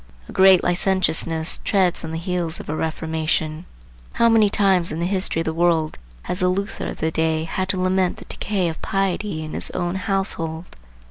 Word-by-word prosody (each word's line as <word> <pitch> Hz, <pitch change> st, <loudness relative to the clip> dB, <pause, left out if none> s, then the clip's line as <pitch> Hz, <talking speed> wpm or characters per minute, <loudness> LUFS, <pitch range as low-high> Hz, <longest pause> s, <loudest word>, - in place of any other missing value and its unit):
A -, -, -10 dB
great 190 Hz, -1 st, +6 dB
licentiousness 175 Hz, -3 st, +1 dB
treads 190 Hz, -4 st, +1 dB
on 160 Hz, -, -5 dB
the 160 Hz, -, -4 dB
heels 170 Hz, -1 st, -2 dB
of -, -, -9 dB
a 155 Hz, -, -1 dB
reformation. 160 Hz, 0 st, -2 dB, 0.5 s
How 235 Hz, -, +4 dB
many 220 Hz, -2 st, +5 dB
times 190 Hz, -4 st, +2 dB
in 155 Hz, -, -4 dB
the 170 Hz, -, 0 dB
history 185 Hz, -3 st, +1 dB
of -, -, -4 dB
the 160 Hz, -, -1 dB
world 165 Hz, -2 st, +1 dB, 0.2 s
has 180 Hz, -, -3 dB
the 180 Hz, -1 st, +2 dB
Luther 200 Hz, +3 st, -3 dB
of -, -, -6 dB
the 160 Hz, -, -1 dB
day 160 Hz, 0 st, 0 dB
had 185 Hz, +3 st, -3 dB
to 190 Hz, -, +1 dB
lament 185 Hz, 0 st, +1 dB
the -, -, -11 dB
decay 195 Hz, -4 st, -2 dB
of 160 Hz, -1 st, -5 dB
piety 195 Hz, -3 st, -1 dB
in 155 Hz, -, -7 dB
his -, -, -1 dB
own 175 Hz, 0 st, -1 dB
household! 185 Hz, -4 st, -2 dB
175 Hz, 195 wpm, -22 LUFS, 160-190 Hz, 0.5 s, great